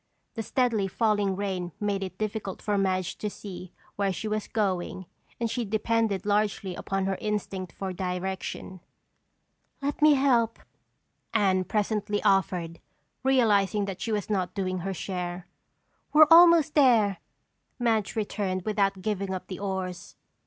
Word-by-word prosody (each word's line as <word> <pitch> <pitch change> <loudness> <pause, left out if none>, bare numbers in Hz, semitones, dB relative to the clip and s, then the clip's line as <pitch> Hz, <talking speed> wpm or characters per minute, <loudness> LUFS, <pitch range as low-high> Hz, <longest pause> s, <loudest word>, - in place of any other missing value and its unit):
The 225 - -4
steadily 225 -4 +1
falling 205 -1 +1
rain 185 -3 -3
made 205 -1 -1
it 185 -1 -5
difficult 215 -2 -3
for 210 - -1
Madge 190 -2 0
to 210 - -2
see 185 -3 -9 0.3
where 200 -1 +1
she 200 +4 -4
was 215 -1 -2
going 190 -3 -2 0.3
and 235 - 0
she 240 +2 -2
depended 220 -2 0
largely 205 -2 0
upon 195 +1 -2
her 195 -1 -1
instinct 200 -3 -3
for 190 -1 -5
direction. 185 +1 -4 1.0
"Let 285 +1 -3
me 300 -1 +7
help," 240 -4 +2 0.8
Anne 190 -3 +3
presently 210 0 -1
offered, 180 -3 +1 0.4
realizing 210 -6 +3
that 195 -2 -6
she 230 - -2
was 210 -3 -1
not 190 -4 -1
doing 185 -2 -1
her 195 +2 -3
share. 180 0 -4 0.7
"We're 310 0 +9
almost 335 -2 +7
there," 230 -9 +4 0.6
Madge 225 -5 0
returned 200 -4 -2
without 195 -2 0
giving 195 -2 -2
up 185 - -6
the 185 -1 -7
oars. 190 -2 -4
200 Hz, 140 wpm, -27 LUFS, 185-220 Hz, 1.0 s, We're